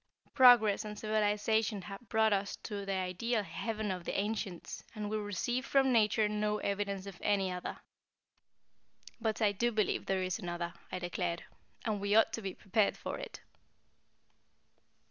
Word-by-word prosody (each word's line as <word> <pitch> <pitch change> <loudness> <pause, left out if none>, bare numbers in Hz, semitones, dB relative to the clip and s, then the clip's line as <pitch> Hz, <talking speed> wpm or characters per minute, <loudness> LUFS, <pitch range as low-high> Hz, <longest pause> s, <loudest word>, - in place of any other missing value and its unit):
Progress 240 -6 +7
and 210 -1 -6
civilization 215 -1 +1
have 200 +4 -9
brought 220 0 +4
to 200 - +5
us 195 0 -4
the 200 -2 -5
ideal 195 +5 -1
heaven 215 +3 -3
of 180 -2 -4
the - - -3
ancients, 200 -3 -3
and 210 -1 -4
we 215 - 0
receive 210 +5 -2
from 270 -1 +3
Nature 215 -1 +4
no 210 0 0
evidence 200 -1 -2
of 195 -3 -9
any 195 -2 +1
other." 180 0 -5 1.4
"But 220 -1 0
I 205 - +5
do 235 +4 0
believe 215 -2 0
there 190 -1 +1
is 185 +2 -2
another," 175 -2 -4 0.2
I - - -2
declared. 175 -1 -2 0.4
"And 210 -3 -1
we 205 +1 +1
ought 225 - +5
to 225 - -3
be 195 -3 -4
prepared 205 +1 +1
for - - -5
it." - - -8
205 Hz, 160 wpm, -33 LUFS, 195-220 Hz, 1.4 s, Progress